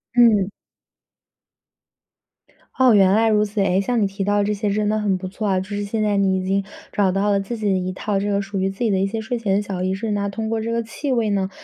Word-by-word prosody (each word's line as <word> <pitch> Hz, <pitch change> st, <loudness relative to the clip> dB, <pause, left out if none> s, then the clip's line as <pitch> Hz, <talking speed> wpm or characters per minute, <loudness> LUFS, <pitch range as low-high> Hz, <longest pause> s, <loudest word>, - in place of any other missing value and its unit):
嗯。 220 Hz, -5 st, +5 dB, 2.3 s
哦， 255 Hz, -2 st, +6 dB
原 195 Hz, -2 st, +5 dB
来 225 Hz, +2 st, +3 dB
如 210 Hz, -1 st, +3 dB
此。 210 Hz, 0 st, -4 dB
哎， 195 Hz, 0 st, +2 dB
像 235 Hz, +3 st, 0 dB
你 -, -, +3 dB
提 195 Hz, +1 st, -4 dB
到 205 Hz, +1 st, +2 dB
这 210 Hz, +1 st, 0 dB
些 210 Hz, 0 st, -2 dB
真 210 Hz, +1 st, 0 dB
的 215 Hz, +1 st, +1 dB
很 200 Hz, -3 st, 0 dB
不 185 Hz, 0 st, -6 dB
错 205 Hz, +3 st, -4 dB
啊。 190 Hz, -2 st, +2 dB
就 190 Hz, -, -6 dB
是 205 Hz, 0 st, -3 dB
现 215 Hz, +2 st, -2 dB
在 210 Hz, -1 st, +1 dB
你 195 Hz, -1 st, +2 dB
已 185 Hz, -, -3 dB
经 195 Hz, +1 st, 0 dB, 0.3 s
找 195 Hz, -2 st, +2 dB
到 195 Hz, +2 st, +1 dB
了 200 Hz, -, +2 dB
自 215 Hz, +4 st, -5 dB
己 215 Hz, -, -5 dB
的 190 Hz, -, +2 dB
一 185 Hz, 0 st, -2 dB
套 200 Hz, +1 st, -2 dB
这 205 Hz, +1 st, -2 dB
个 200 Hz, 0 st, +1 dB
属 200 Hz, 0 st, -4 dB
于 190 Hz, +1 st, +1 dB
自 195 Hz, -, -10 dB
己 225 Hz, -, +2 dB
的 190 Hz, -, +1 dB
一 195 Hz, -, +1 dB
些 225 Hz, +3 st, -4 dB
睡 240 Hz, +3 st, -3 dB
前 200 Hz, -4 st, 0 dB
的 205 Hz, -, +2 dB
小 195 Hz, -3 st, -5 dB
仪 185 Hz, 0 st, 0 dB
式， 210 Hz, +3 st, -3 dB
那 200 Hz, -1 st, -1 dB
通 220 Hz, +2 st, -4 dB
过 225 Hz, 0 st, -1 dB
这 230 Hz, +1 st, -3 dB
个 230 Hz, 0 st, 0 dB
气 270 Hz, +5 st, -4 dB
味 230 Hz, -4 st, +1 dB
呢 195 Hz, -1 st, 0 dB
205 Hz, 295 characters per minute, -21 LUFS, 195-220 Hz, 2.3 s, 哦